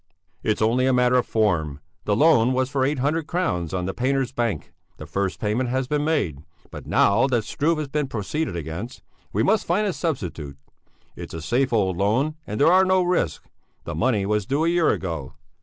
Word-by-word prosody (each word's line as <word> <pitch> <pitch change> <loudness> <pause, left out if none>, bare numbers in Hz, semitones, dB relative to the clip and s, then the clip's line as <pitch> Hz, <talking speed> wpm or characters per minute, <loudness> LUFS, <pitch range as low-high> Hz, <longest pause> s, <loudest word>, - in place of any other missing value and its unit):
"It's 110 0 0
only 125 +4 +2
a 130 - +3
matter 125 0 +3
of 125 - +1
form; 85 -10 0 0.3
the 105 - +1
loan 130 -3 +4
was 130 +1 0
for 135 -2 +1
eight 140 +2 0
hundred 150 +4 0
crowns 90 - -1
on 90 -1 -2
the 95 - -3
Painters' 130 0 0
Bank; 115 - -2 0.2
the 75 - -8
first 95 +4 -2
payment 115 +4 -1
has 130 +1 -1
been 150 +1 0
made, 145 - 0 0.3
but - - -9
now 110 +7 +3
that 120 -4 +1
Struve 160 +8 0
has 155 -1 -3
been 145 0 -1
proceeded 130 - -3
against, 85 - -6 0.3
we - - +1
must 215 +1 +2
find 190 +5 +1
a 195 - 0
substitute. 85 - -4 0.6
It's - - -8
a - - -4
safe 125 - +1
old 95 -6 +1
loan 115 +11 +1
and 105 - -4
there 165 +4 +5
are 190 +1 +6
no 185 -1 +3
risks; 175 - -1 0.4
the 85 - -5
money 105 +3 +1
was 105 -1 0
due 145 +4 +1
a - - +3
year 170 -1 +3
ago." 80 -6 -3
125 Hz, 205 wpm, -23 LUFS, 95-150 Hz, 0.6 s, are